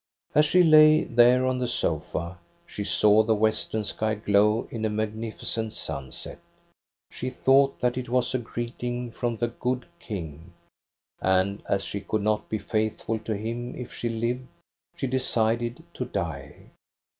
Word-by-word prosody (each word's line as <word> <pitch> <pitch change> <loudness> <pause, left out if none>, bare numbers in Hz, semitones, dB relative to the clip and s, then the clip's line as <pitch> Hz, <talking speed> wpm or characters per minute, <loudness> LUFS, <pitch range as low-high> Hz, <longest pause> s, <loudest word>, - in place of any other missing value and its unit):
As 150 - +5
she 180 +3 +5
lay 155 -1 +7
there 120 +2 +4
on 130 0 0
the 125 - -1
sofa, 85 -3 -2 0.3
she 105 - -5
saw 105 +1 +4
the 110 0 +2
western 110 0 0
sky 110 +1 -1
glow 105 +1 +2
in 115 -2 -4
a 110 - +1
magnificent 110 +1 -3
sunset. 70 -4 -5 0.7
She 130 - -4
thought 135 +1 +3
that 125 0 +1
it 125 - -6
was 125 0 +1
a 130 - +1
greeting 120 +1 -4
from 120 0 -2
the 120 +1 0
good 125 +1 -2
King; 85 - -7 0.7
and 95 +2 +2
as 100 0 +1
she 100 - -4
could 105 +1 -2
not 105 0 0
be 110 - -1
faithful 110 +1 -2
to 110 0 -3
him 120 +3 -4
if 125 -1 -8
she 120 - -3
lived, 120 +3 -2 0.5
she - - -3
decided 120 0 0
to 125 - -4
die. 85 - -5
115 Hz, 155 wpm, -26 LUFS, 105-125 Hz, 0.7 s, lay